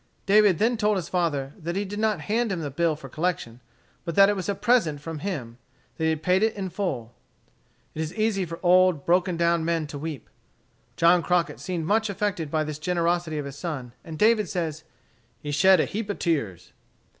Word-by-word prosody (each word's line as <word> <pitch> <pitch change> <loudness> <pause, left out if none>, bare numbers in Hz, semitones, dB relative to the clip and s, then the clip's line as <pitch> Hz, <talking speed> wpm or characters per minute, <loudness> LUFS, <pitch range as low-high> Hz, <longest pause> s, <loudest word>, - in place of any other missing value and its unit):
David 205 -3 +5
then 230 +5 +2
told 210 -1 +2
his 175 -2 -4
father 145 -6 -1
that 170 +1 -4
he 200 +1 -1
did 205 +2 -6
not 220 -1 +1
hand 225 +1 0
him 180 -3 -2
the 145 -3 -4
bill 165 +2 +1
for 150 - -10
collection, 155 -9 -3 0.4
but 170 -2 -4
that 195 0 +7
it 205 - +1
was 190 -1 -4
a 200 - 0
present 205 -11 +2
from 160 +1 -6
him 130 -11 -5 0.4
that 160 - -1
he - - +3
had 160 -1 -2
paid 185 +3 +3
it 220 0 +1
in 195 -2 -4
full. 130 - -3 0.8
It 155 - -4
is 160 0 -3
easy 215 -3 +1
for 165 -1 -6
old 185 0 +5
and 140 - -15
broken 180 0 +2
down 170 -1 +2
men 165 -1 0
to 145 -1 -7
weep. 150 -5 -6 0.7
John 170 +1 +5
Crockett 175 0 0
seemed 175 -4 -3
much 220 +4 +1
affected 195 -6 -2
by 155 +1 0
this 150 -1 -5
generosity 170 -1 0
of 145 - -3
his 140 0 -8
son, 145 -8 -5
and 160 -1 -8
David 215 -2 +3
says 160 -3 -3 0.6
"he 145 - -5
shed 190 +5 +5
a - - +3
heap 215 0 -5
of 205 - -2
tears." 105 - -2
170 Hz, 215 wpm, -25 LUFS, 155-195 Hz, 0.8 s, that